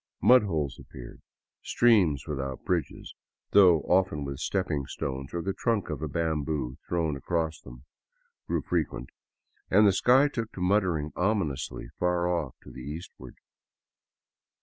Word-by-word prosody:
Mud 125 Hz, 0 st, +7 dB
holes 80 Hz, -9 st, -2 dB
appeared; 60 Hz, -2 st, -12 dB, 0.4 s
streams 95 Hz, -, +3 dB
without 65 Hz, -3 st, -4 dB
bridges, 90 Hz, -5 st, -2 dB, 0.4 s
though 90 Hz, -5 st, +6 dB
often 90 Hz, -6 st, +1 dB
with 70 Hz, -1 st, -5 dB
stepping 75 Hz, -8 st, -1 dB
stones 65 Hz, 0 st, -5 dB
or 85 Hz, -1 st, -3 dB
the 95 Hz, -, -1 dB
trunk 110 Hz, -6 st, -1 dB
of 75 Hz, -2 st, -5 dB
a 80 Hz, -, -2 dB
bamboo 75 Hz, -4 st, -2 dB
thrown 80 Hz, -4 st, 0 dB
across 80 Hz, +3 st, -2 dB
them, -, -, -13 dB, 0.6 s
grew -, -, -1 dB
frequent, -, -, -2 dB, 0.6 s
and 105 Hz, -, +5 dB
the 100 Hz, -, +5 dB
sky 130 Hz, +8 st, +5 dB
took 115 Hz, -6 st, -4 dB
to -, -, -8 dB
muttering 90 Hz, -5 st, +1 dB
ominously 90 Hz, -7 st, -1 dB
far 90 Hz, -1 st, +1 dB
off 90 Hz, -1 st, -2 dB
to -, -, -12 dB
the 65 Hz, -, -10 dB
eastward. 75 Hz, +7 st, -9 dB
85 Hz, 140 wpm, -28 LUFS, 70-95 Hz, 0.6 s, Mud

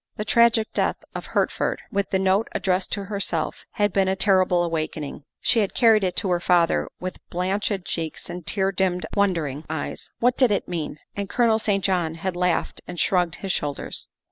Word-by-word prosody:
The 210 Hz, -, -3 dB
tragic 230 Hz, 0 st, +4 dB
death -, -, 0 dB
of -, -, -6 dB
Hertford, -, -, 0 dB
with 200 Hz, 0 st, 0 dB
the 190 Hz, -, +2 dB
note 190 Hz, +3 st, +2 dB
addressed 185 Hz, 0 st, 0 dB
to 200 Hz, -, -2 dB
herself, 200 Hz, 0 st, -2 dB
had 205 Hz, -2 st, +1 dB
been 195 Hz, -1 st, +3 dB
a 190 Hz, -, +1 dB
terrible 185 Hz, -3 st, +3 dB
awakening. 155 Hz, -4 st, -3 dB, 0.2 s
She 235 Hz, -, +3 dB
had 205 Hz, -3 st, 0 dB
carried 220 Hz, -3 st, +5 dB
it 180 Hz, -1 st, 0 dB
to 195 Hz, -4 st, 0 dB
her 175 Hz, -, +2 dB
father 170 Hz, -1 st, +2 dB
with 185 Hz, 0 st, -5 dB
blanched 190 Hz, +1 st, -1 dB
cheeks 160 Hz, -2 st, -4 dB
and 175 Hz, 0 st, -6 dB
tear 190 Hz, +3 st, 0 dB
dimmed, 185 Hz, -1 st, 0 dB
wondering 165 Hz, -8 st, 0 dB
eyes. 160 Hz, -, -4 dB
W 245 Hz, +2 st, +4 dB
T 265 Hz, -, +2 dB
hat 250 Hz, -, +6 dB
did 205 Hz, -, +3 dB
it -, -, -3 dB
mean? 165 Hz, -4 st, -4 dB, 0.2 s
And 200 Hz, -1 st, -3 dB
Colonel 230 Hz, -3 st, +3 dB
St. 200 Hz, -3 st, 0 dB
John 175 Hz, -4 st, +1 dB
had 180 Hz, +2 st, -3 dB
laughed 180 Hz, -1 st, 0 dB
and 175 Hz, -, -6 dB
shrugged 180 Hz, -3 st, +2 dB
his 195 Hz, -, -3 dB
shoulders. 145 Hz, -4 st, -3 dB
190 Hz, 195 wpm, -24 LUFS, 175-200 Hz, 0.2 s, hat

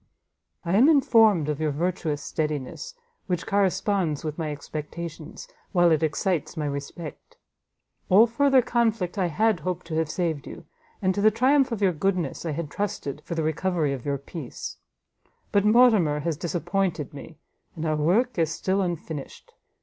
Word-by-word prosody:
I 170 Hz, +2 st, +1 dB
am 260 Hz, +7 st, +6 dB
informed 225 Hz, -, +5 dB
of 150 Hz, -1 st, -2 dB
your 155 Hz, -, +1 dB
virtuous 155 Hz, -1 st, -2 dB
steadiness, 155 Hz, -, -4 dB, 0.3 s
which 180 Hz, -3 st, -2 dB
corresponds 195 Hz, -5 st, +1 dB
with 155 Hz, -1 st, -3 dB
my 155 Hz, -2 st, -3 dB
expectations, 155 Hz, +2 st, -7 dB, 0.3 s
while 175 Hz, -2 st, +5 dB
it 155 Hz, -, +3 dB
excites 160 Hz, +2 st, -1 dB
my 150 Hz, -, -1 dB
respect. 145 Hz, +2 st, -7 dB, 0.7 s
All 205 Hz, +5 st, +7 dB
further 265 Hz, +2 st, +3 dB
conflict 225 Hz, -6 st, 0 dB
I 185 Hz, -, +2 dB
had 215 Hz, +4 st, +1 dB
hoped 180 Hz, +2 st, -4 dB
to 165 Hz, -2 st, -5 dB
have 160 Hz, -1 st, 0 dB
saved 160 Hz, -4 st, -2 dB
you; -, -, -10 dB, 0.4 s
and 185 Hz, 0 st, +3 dB
to 200 Hz, -, -2 dB
the 215 Hz, -, +6 dB
triumph 260 Hz, +4 st, +3 dB
of 215 Hz, -3 st, -2 dB
your 185 Hz, -2 st, +3 dB
goodness 175 Hz, -2 st, -1 dB
I -, -, -1 dB
had 155 Hz, -1 st, -4 dB
trusted 150 Hz, -8 st, -3 dB
for 170 Hz, -, -4 dB
the 165 Hz, -, -1 dB
recovery 160 Hz, -1 st, 0 dB
of 130 Hz, -3 st, -6 dB
your 140 Hz, -1 st, -1 dB
peace: 140 Hz, -1 st, -8 dB, 0.7 s
but 200 Hz, 0 st, +3 dB
Mortimer 210 Hz, -10 st, +5 dB
has 165 Hz, +1 st, -1 dB
disappointed 175 Hz, -1 st, -2 dB
me, 150 Hz, +2 st, -10 dB, 0.4 s
and 160 Hz, -, -4 dB
our 155 Hz, -1 st, +1 dB
work 190 Hz, +9 st, +1 dB
is 160 Hz, -2 st, +2 dB
still 190 Hz, +4 st, 0 dB
unfinished. 165 Hz, -5 st, -5 dB
170 Hz, 165 wpm, -25 LUFS, 155-200 Hz, 0.7 s, All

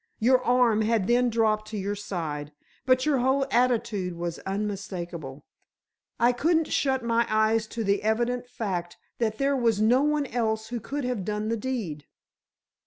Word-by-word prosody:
Your 250 Hz, +2 st, +3 dB
arm 245 Hz, -3 st, +3 dB
had 220 Hz, -2 st, +1 dB
then 245 Hz, +3 st, +3 dB
dropped 215 Hz, -2 st, +1 dB
to 215 Hz, 0 st, -5 dB
your 200 Hz, +1 st, -2 dB
side, 160 Hz, -8 st, -4 dB, 0.4 s
but 255 Hz, +1 st, +4 dB
your 290 Hz, -4 st, +2 dB
whole 265 Hz, +2 st, +2 dB
attitude 235 Hz, -7 st, +1 dB
was 170 Hz, 0 st, -4 dB
unmistakable. 185 Hz, -8 st, -5 dB, 0.7 s
I 240 Hz, +1 st, +5 dB
couldn't 320 Hz, +6 st, +1 dB
shut 265 Hz, -2 st, +1 dB
my 235 Hz, 0 st, +1 dB
eyes 220 Hz, 0 st, +2 dB
to 230 Hz, +1 st, -4 dB
the 200 Hz, 0 st, +1 dB
evident 240 Hz, +3 st, 0 dB
fact 180 Hz, -8 st, -4 dB, 0.2 s
that 220 Hz, -2 st, 0 dB
there 280 Hz, 0 st, +1 dB
was 230 Hz, -5 st, +2 dB
no 235 Hz, +5 st, +4 dB
one 300 Hz, 0 st, +1 dB
else 220 Hz, -3 st, -2 dB
who 240 Hz, -1 st, -3 dB
could 280 Hz, +6 st, -4 dB
have 250 Hz, -6 st, -2 dB
done 210 Hz, +2 st, -2 dB
the 230 Hz, -, +1 dB
deed." 210 Hz, -, -4 dB
225 Hz, 165 wpm, -26 LUFS, 200-250 Hz, 0.7 s, I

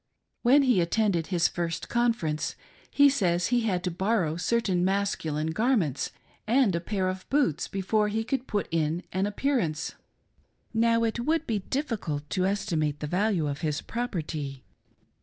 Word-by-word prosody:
When 270 Hz, +4 st, +5 dB
he 245 Hz, -9 st, +4 dB
attended 175 Hz, -2 st, +1 dB
his 175 Hz, -2 st, +2 dB
first 165 Hz, -1 st, -3 dB
Conference, 230 Hz, -11 st, 0 dB, 0.3 s
he 285 Hz, 0 st, +6 dB
says 180 Hz, -10 st, +1 dB
he 245 Hz, 0 st, +3 dB
had 190 Hz, -6 st, 0 dB
to 180 Hz, -, -1 dB
borrow 185 Hz, -3 st, 0 dB
certain 185 Hz, -1 st, +1 dB
mascu 195 Hz, -4 st, 0 dB
line 155 Hz, +2 st, -1 dB
garments 190 Hz, -, +1 dB, 0.4 s
and 240 Hz, -3 st, +4 dB
a -, -, +1 dB
pair 190 Hz, 0 st, -1 dB
of 185 Hz, 0 st, -4 dB
boots 270 Hz, -, +1 dB
before 210 Hz, +2 st, 0 dB
he 220 Hz, +2 st, -1 dB
could 255 Hz, +2 st, -2 dB
put 205 Hz, -2 st, -1 dB
in 165 Hz, +1 st, 0 dB
an 190 Hz, +2 st, +1 dB
appearance. 205 Hz, -, -1 dB, 0.8 s
Now 230 Hz, 0 st, +3 dB
it 225 Hz, +1 st, 0 dB
would 315 Hz, +6 st, 0 dB
be 220 Hz, -6 st, 0 dB
difficult 195 Hz, -, -3 dB
to 185 Hz, 0 st, +1 dB
estimate 155 Hz, -7 st, -1 dB
the 150 Hz, -, -3 dB
value 180 Hz, +1 st, +1 dB
of 140 Hz, +1 st, -4 dB
his.property. 155 Hz, -, -3 dB
190 Hz, 155 wpm, -27 LUFS, 165-230 Hz, 0.8 s, he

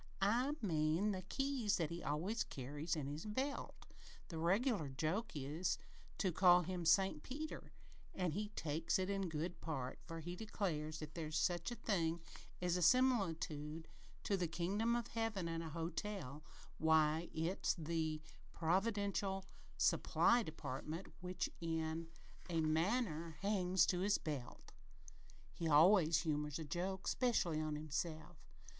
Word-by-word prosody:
"I 245 Hz, +8 st, +3 dB
mean 165 Hz, +2 st, +2 dB
the 190 Hz, -2 st, -2 dB
keys 250 Hz, +1 st, 0 dB
thet 165 Hz, -2 st, -1 dB
he 170 Hz, +1 st, -4 dB
always 175 Hz, +11 st, -1 dB
carries 145 Hz, +5 st, -3 dB
in 150 Hz, -3 st, -2 dB
his 145 Hz, +3 st, -4 dB
belt. 265 Hz, +7 st, -3 dB, 0.4 s
The 165 Hz, -, -4 dB
reg'lar 195 Hz, -, +2 dB
joke 160 Hz, -, -1 dB
there 145 Hz, -, -4 dB
is 180 Hz, +1 st, +1 dB, 0.4 s
to 190 Hz, -, +1 dB
call 180 Hz, 0 st, +6 dB
him 175 Hz, 0 st, -3 dB
'St. 190 Hz, -1 st, +4 dB
Peter,' 305 Hz, -, -6 dB, 0.4 s
an' 180 Hz, -3 st, 0 dB
he 210 Hz, +6 st, -2 dB
takes 160 Hz, -5 st, 0 dB
it 190 Hz, +1 st, 0 dB
in 195 Hz, -2 st, -1 dB
good 160 Hz, +3 st, -3 dB
part, 135 Hz, -6 st, -3 dB
for, 165 Hz, -1 st, -5 dB
he 175 Hz, +2 st, -5 dB
declares, 155 Hz, -7 st, -3 dB
if 155 Hz, 0 st, -7 dB
there 165 Hz, -2 st, -4 dB
is 155 Hz, -, -5 dB
such 175 Hz, +3 st, +1 dB
a 240 Hz, -, -4 dB
thing 170 Hz, -8 st, 0 dB, 0.4 s
as 180 Hz, 0 st, +2 dB
a -, -, -1 dB
similitude 165 Hz, -, +2 dB, 0.4 s
to 200 Hz, -, +1 dB
the 180 Hz, -3 st, 0 dB
kingdom 200 Hz, +8 st, 0 dB
o' 240 Hz, -, 0 dB
Heaven 225 Hz, -6 st, -1 dB
in 165 Hz, 0 st, -2 dB
a 165 Hz, -, -5 dB
hotel, 165 Hz, -2 st, -4 dB, 0.4 s
why, 160 Hz, +1 st, +3 dB
it's 165 Hz, +4 st, 0 dB
in 165 Hz, -, -6 dB
the 160 Hz, -1 st, -1 dB, 0.3 s
providential 195 Hz, +2 st, 0 dB, 0.3 s
supply 240 Hz, +1 st, +4 dB
department 155 Hz, -, -5 dB
which, 180 Hz, 0 st, -2 dB
in 165 Hz, 0 st, -2 dB, 0.4 s
a 165 Hz, -2 st, +1 dB
manner, 165 Hz, 0 st, 0 dB
hangs 185 Hz, -3 st, +3 dB
to 180 Hz, -, +1 dB
his 200 Hz, +2 st, +3 dB
belt. 145 Hz, -6 st, -6 dB, 0.8 s
He 165 Hz, -, -2 dB
always 165 Hz, +1 st, +6 dB
humors 150 Hz, -3 st, -1 dB
a 160 Hz, -, -4 dB
joke 185 Hz, +5 st, -3 dB
'specially 180 Hz, -11 st, +2 dB
on 155 Hz, -1 st, -1 dB
himself." 155 Hz, +1 st, -3 dB
170 Hz, 150 wpm, -39 LUFS, 155-195 Hz, 0.8 s, call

